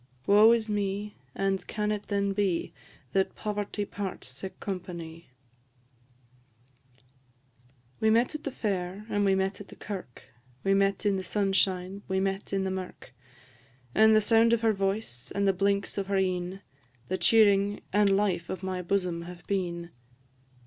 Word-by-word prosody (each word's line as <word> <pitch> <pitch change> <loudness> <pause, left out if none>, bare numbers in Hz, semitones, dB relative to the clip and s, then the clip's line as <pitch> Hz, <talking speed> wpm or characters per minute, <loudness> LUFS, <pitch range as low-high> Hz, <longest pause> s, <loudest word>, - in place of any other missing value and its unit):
Woe 210 +3 +7
is 230 -2 +2
me! 205 0 -2 0.2
and 195 -1 -1
can 210 0 -1
it 210 -1 -3
then 200 -1 0
be, 195 -4 0 0.4
That 190 0 +1
poverty 205 -1 -3
parts 195 -10 -5
sic 140 +9 -8
companie? 170 -4 -6 2.7
We 220 - +3
met 235 +5 +3
at 305 - -6
the - - -2
fair, 195 -4 -3
and 205 0 +1
we 195 -1 +4
met 190 +1 -1
at 200 - -10
the - - -12
kirk; 190 - -7 0.4
We 195 - +3
met 195 +1 +1
in 200 -2 +3
the 190 - -3
sunshine, 195 -1 0
we 190 -1 0
met 195 +1 -2
in 195 -1 0
the 190 - -1
mirk; 185 -7 -7 0.8
And 220 +1 +6
the 215 - +5
sound 225 +2 +4
of 230 - +2
her 225 -1 +3
voice, 195 - -3
and 200 0 +2
the 195 - +4
blinks 200 +1 0
of 195 - -3
her 200 0 +1
een, 185 0 -1 0.5
The 185 0 -2
cheering 205 0 +4
and 200 -1 +4
life 185 -4 0
of 185 0 -5
my 185 -1 -2
bosom 180 -2 -1
have 175 -1 -11
been. 175 -3 -2
195 Hz, 160 wpm, -28 LUFS, 185-205 Hz, 2.7 s, Woe